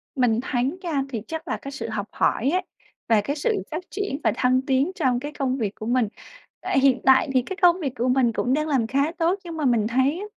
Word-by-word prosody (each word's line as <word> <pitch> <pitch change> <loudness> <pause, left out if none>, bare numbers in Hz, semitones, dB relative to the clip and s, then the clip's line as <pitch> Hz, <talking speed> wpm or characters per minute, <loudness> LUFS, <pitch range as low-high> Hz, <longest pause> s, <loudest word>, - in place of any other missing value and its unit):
Mình 245 -4 +2
thấy 260 +6 -1
nha, 310 -6 -1
thì 230 -5 -4
chắc 320 +1 -6
là - - -2
cái 275 - -8
sự 280 -4 -5
học 210 -2 -3
hỏi 255 - +1
ấy, 365 +2 +1 0.5
và 220 -2 +5
cái 280 +8 -3
sự 405 +8 -1
phát 320 +4 -4
triển 400 -8 -3
và 220 - +3
thăng 255 +1 +2
tiến 265 +5 +1
trong 255 -6 +1
cái 290 +3 -6
công 265 -2 -1
việc 210 -5 -2
của 215 - -8
mình. 245 -1 +2 0.5
À, - - -2
hiện 265 -2 +3
tại 265 +2 +5
thì 255 - +4
cái 365 +10 -7
công 355 0 +5
việc 275 -7 -3
của 245 +1 -1
mình 250 -2 +3
cũng 250 +3 0
đang 305 +2 0
làm 260 -7 +1
khá 280 +5 +1
tốt, 350 +3 +1
nhưng 335 -2 -7
mà 305 - -1
mình 230 -4 +2
thấy 260 +6 +1
á, 410 - -5
265 Hz, 255 wpm, -24 LUFS, 245-310 Hz, 0.5 s, và